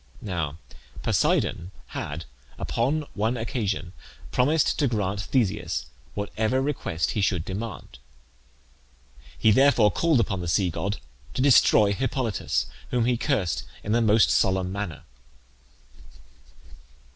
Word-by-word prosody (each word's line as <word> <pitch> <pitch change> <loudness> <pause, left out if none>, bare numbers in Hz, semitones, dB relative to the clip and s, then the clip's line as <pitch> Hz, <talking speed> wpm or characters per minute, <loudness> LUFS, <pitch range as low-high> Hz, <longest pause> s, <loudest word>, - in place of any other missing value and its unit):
Now 85 -7 -3 0.5
Poseidon 85 +1 +1 0.2
had 75 +2 -5 0.3
upon 145 +6 -1
one 110 +4 0
occasion 105 - -2 0.4
promised 145 +5 +2
to 145 - +3
grant 100 -4 -1
Theseus 105 -4 -1 0.3
whatever 110 +4 -1
request 130 - -1
he 105 - -1
should 90 -3 +1
demand; 95 - -6 1.4
he 110 - +4
therefore 120 -3 +5
called 165 -6 +2
upon 100 -5 0
the 85 - -4
sea 90 +2 +2
god 100 +6 -2 0.4
to - - 0
destroy 110 -6 +5
Hippolytus, 130 -1 -1 0.2
whom 120 -2 +1
he 125 0 +2
cursed 105 - 0 0.2
in 105 - -3
the 120 +2 +3
most 110 0 +4
solemn 95 -1 +2
manner. 100 -5 -5
105 Hz, 115 wpm, -25 LUFS, 95-125 Hz, 1.4 s, therefore